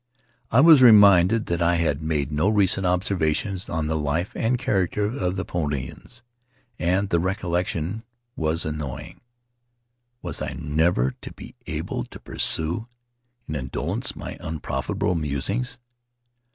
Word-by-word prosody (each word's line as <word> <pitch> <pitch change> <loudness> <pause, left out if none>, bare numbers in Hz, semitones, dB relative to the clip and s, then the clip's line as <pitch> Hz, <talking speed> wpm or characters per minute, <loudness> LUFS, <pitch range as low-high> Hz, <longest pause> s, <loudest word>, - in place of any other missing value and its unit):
I 115 - +5
was 155 -3 +8
reminded 105 -2 +7
that 85 0 -2
I 85 +1 +3
had 80 -3 0
made 75 -2 -1
no 75 +7 +2
recent 100 -3 +2
observations 90 0 0
on 80 -1 -1
the 80 +1 -1
life 80 +4 -1
and 120 +2 0
character 105 -5 0
of 95 -5 -2
the 95 - -3
Paumotuans, 75 - -5 0.6
and 90 +3 +1
the 85 - +2
recollection 90 0 -2 0.3
was 80 +1 -1
annoying. 75 -5 -6 1.0
Was 85 -4 -5
I - - -3
never 75 -3 +1
to - - -8
be - - -11
able - - -3
to - - -12
pursue, 85 +8 -1 0.6
in - - -4
indolence, 65 -3 -3
my - - -7
unprofitable 80 +2 -2
musings? 85 - -2
85 Hz, 130 wpm, -24 LUFS, 80-100 Hz, 1.0 s, was